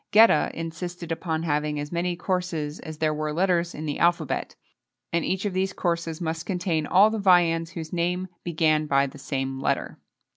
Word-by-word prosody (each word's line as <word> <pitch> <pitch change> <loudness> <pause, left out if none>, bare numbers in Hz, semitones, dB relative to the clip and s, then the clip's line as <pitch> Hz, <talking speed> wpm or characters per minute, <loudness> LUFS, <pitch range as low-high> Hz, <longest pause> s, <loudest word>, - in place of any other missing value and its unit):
[XXII 220 +2 +9
29] - - +5 0.2
Geta - - -9
insisted 170 +1 -5
upon 160 -1 -2
having 150 -1 0
as 145 0 -5
many 175 +1 -1
courses 175 -4 -2
as 155 -2 -8
there 155 0 +1
were 155 0 -2
letters 175 +1 +1
in 155 - -5
the 145 - -3
alphabet, 170 -3 +1 0.6
and 170 -1 +2
each 190 +2 -1
of 200 - -1
these 190 +1 0
courses 170 -2 -2
must 160 -1 -3
contain 175 -5 -1
all 200 +4 +6
the 220 - -2
viands 170 -3 +3
whose 160 -1 -6
name 180 +2 0 0.2
began 155 -2 +1
by 140 -1 +3
the 140 +1 -9
same 135 -1 -3
letter. 135 - -1
165 Hz, 190 wpm, -25 LUFS, 155-180 Hz, 0.6 s, XXII